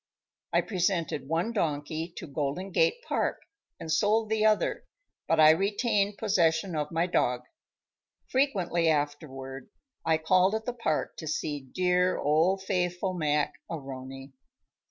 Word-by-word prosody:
I - - +3
presented 175 -7 -1
one 165 +8 0
donkey 160 -2 -2
to - - -6
Golden 150 +6 -3
Gate 485 0 +2
Park, - - 0 0.4
and 160 - -5
sold 210 +6 +2
the 220 -1 +2
other, 215 -1 +2 0.4
but 165 - +2
I 155 0 +9
retained 205 +3 +1
possession 175 -4 +1
of 150 -1 -1
my 165 +1 +1
dog. 125 -8 +1 0.8
Frequently 185 - +1
afterward 145 -2 -3 0.3
I 160 -1 +3
called 185 +5 +3
at 220 0 -3
the 245 - -2
park 195 -11 -2
to 160 - -7
see 145 -3 -3
dear 180 0 +2
old 165 +6 +2
faithful 180 -1 -1
Mac 150 -4 0 0.2
A'Rony. 135 -2 -7
170 Hz, 135 wpm, -28 LUFS, 150-195 Hz, 0.8 s, I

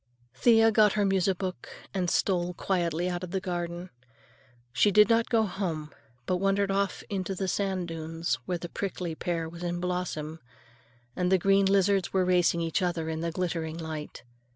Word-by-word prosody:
Thea 225 - +5
got 215 -2 +5
her 210 -1 +1
music 195 -1 +2
book 185 -2 -5 0.2
and 185 -3 0
stole 180 -2 +1
quietly 175 -2 0
out 175 0 -3
of 180 - -5
the 190 - -1
garden. 175 -1 -4 0.8
She 130 +11 +4
did 210 +1 +6
not 230 0 +3
go 225 -2 +3
home, 170 -7 -3 0.3
but 180 - +1
wandered 195 +1 +1
off 195 0 -1
into 195 -2 -3
the 190 +1 -2
sand 190 -2 -1
dunes, 165 -3 -3
where 180 - -1
the 175 - -6
prickly 180 -2 -4
pear 165 0 -2
was 170 +1 -10
in 175 0 -2
blossom 175 -3 -3 0.8
and 180 0 0
the 190 - +6
green 195 +2 +3
lizards 195 -1 +2
were 190 -1 +2
racing 175 -2 +3
each 165 +3 0
other 170 -3 -1
in 160 0 -3
the 170 - -1
glittering 165 -2 -3
light. 160 -2 -6
180 Hz, 175 wpm, -28 LUFS, 170-195 Hz, 0.8 s, did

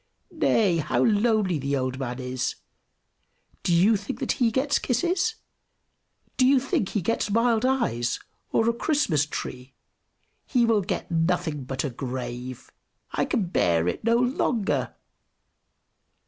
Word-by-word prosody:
Nay, 195 -6 +2
how 155 -1 +1
lonely 210 -6 +2
the 140 +1 -1
old 130 0 -2
man 125 -2 -3
is 130 -1 -3 1.1
do - - -1
you 185 +6 +5
think 200 0 -4
that - - 0
he 245 -4 +2
gets 270 +5 +1
kisses? 355 - 0 1.0
Do 255 - +5
you 270 0 +5
think 250 -7 -1
he 205 - -2
gets 230 +2 0
mild 230 +2 +2
eyes, 235 - 0 0.3
or 225 - +2
a 235 - +3
Christmas 235 - +1
tree? 130 -2 -6 0.7
He 245 -4 +3
will 225 -3 +3
get 190 -1 -4
nothing 165 -4 0
but 130 0 -3
a 140 - -2
grave! 125 0 -6 0.4
I - - 0
can 215 - 0
bear 85 - +2
it - - -2
no 230 +1 +3
longer!" 245 -3 0
195 Hz, 140 wpm, -25 LUFS, -, 1.1 s, you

